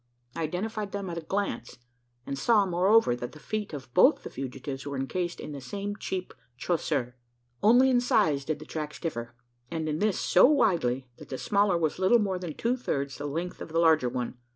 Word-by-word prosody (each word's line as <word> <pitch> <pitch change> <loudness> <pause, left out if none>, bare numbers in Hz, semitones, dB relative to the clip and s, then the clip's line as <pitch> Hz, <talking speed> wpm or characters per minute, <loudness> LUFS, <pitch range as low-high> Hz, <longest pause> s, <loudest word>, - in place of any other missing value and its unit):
I - - -3
identified 200 +5 -3
them 200 -3 -3
at 170 - -3
a - - -8
glance; 165 - -3 0.5
and 140 - -3
saw, 210 +8 +3
moreover, 190 - +4
that 120 0 -6
the 155 - -12
feet 215 +4 -4
of 130 -5 -8
both - - +5
the - - -7
fugitives 135 +1 -6
were 140 -1 -4
encased 175 +6 -2
in 150 - -7
the 140 -2 -7
same 200 +9 -4
cheap 190 -3 -4 0.2
chaussure. 130 -6 -1 0.4
Only 245 +5 +6
in 245 -1 +4
size 150 - +2
did 155 +2 -2
the 155 - -11
tracks 150 -1 -5
differ; 120 -8 -4 0.3
and 160 -2 -3
in 155 0 -1
this 210 -1 +1
so 180 - +5
widely, 165 - +2
that - - -12
the 130 - -4
smaller 200 0 +2
was 160 0 -1
little 190 +6 +5
more 195 -4 -1
than 175 -4 -6
two 240 +2 0
thirds 140 - -3
the 145 - -3
length 170 +5 -4
of - - -6
the 165 - +2
larger 160 -6 +4
one! 125 0 -4
165 Hz, 205 wpm, -28 LUFS, 140-200 Hz, 0.5 s, Only